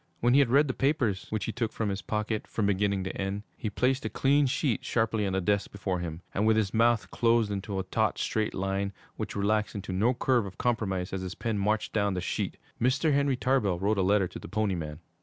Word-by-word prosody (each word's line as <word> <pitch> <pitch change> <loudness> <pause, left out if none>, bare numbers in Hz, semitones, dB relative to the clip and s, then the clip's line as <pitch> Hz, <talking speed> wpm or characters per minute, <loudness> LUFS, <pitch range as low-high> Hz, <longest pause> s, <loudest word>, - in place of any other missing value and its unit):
When 120 +1 +3
he 140 - +6
had 140 -4 +4
read 145 +4 +5
the 130 - -1
papers, 130 -9 0
which 110 -3 -2
he - - -2
took 115 -1 -2
from 110 -2 -2
his 100 0 -3
pocket, 110 0 -2
from 110 - -1
beginning 100 -1 +1
to 95 - -4
end, 100 +1 -3
he 110 - -3
placed 130 +5 +1
a 110 - -2
clean 140 +3 +3
sheet 130 -2 0
sharply 110 -3 0
on 95 - -2
the 95 - +1
desk 100 +2 0
before 95 -2 -2
him, 85 0 -5
and 105 +3 +1
with 110 0 +4
his 105 -3 0
mouth 115 0 +2
closed 115 -2 +2
into 100 0 -3
a 95 - -1
taut, 95 - 0
straight 110 -1 -1
line 95 +1 -1 0.2
which - - -5
relaxed 105 +2 0
into 95 -2 -4
no 115 +7 +2
curve 120 -3 +2
of 95 - -11
compromise 95 -6 -1
as 95 - -2
his 90 -1 -5
pen 110 -3 -2
marched 105 +2 0
down 100 -3 +1
the - - -1
sheet, - - -2 0.2
Mr. 135 +5 +2
Henry 140 -2 +2
Tarbell 115 -6 +1
wrote 100 +3 +1
a - - +4
letter 95 0 +3
to - - -9
the - - -9
Pony 110 -3 0
Man. 80 -2 -5
105 Hz, 240 wpm, -28 LUFS, 95-120 Hz, 0.2 s, he